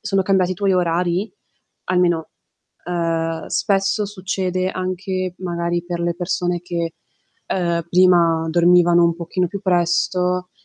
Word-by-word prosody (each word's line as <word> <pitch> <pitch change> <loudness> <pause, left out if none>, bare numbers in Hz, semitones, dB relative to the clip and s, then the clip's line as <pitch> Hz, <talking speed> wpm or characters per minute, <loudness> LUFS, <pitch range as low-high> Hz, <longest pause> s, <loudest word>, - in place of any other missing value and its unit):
sono 195 -2 0
cambiati 185 -1 +2
i - - -5
tuoi 195 +1 0
orari? 180 +3 0 0.5
Almeno, 175 -3 +1 0.5
ehm, 165 -2 -2
spesso 200 +1 0
succede 185 -2 -2
anche, 185 0 -3
magari, 175 -1 -2
per 175 -1 -4
le 170 0 -1
persone 175 -1 -1
che, 170 -2 -4 0.5
ehm, 170 -2 -1
prima 170 -3 +4
dormivano 175 0 +5
un 170 - +2
pochino 180 +1 -2
più 200 +2 -6
presto, 180 0 +1
180 Hz, 125 wpm, -20 LUFS, 170-185 Hz, 0.5 s, dormivano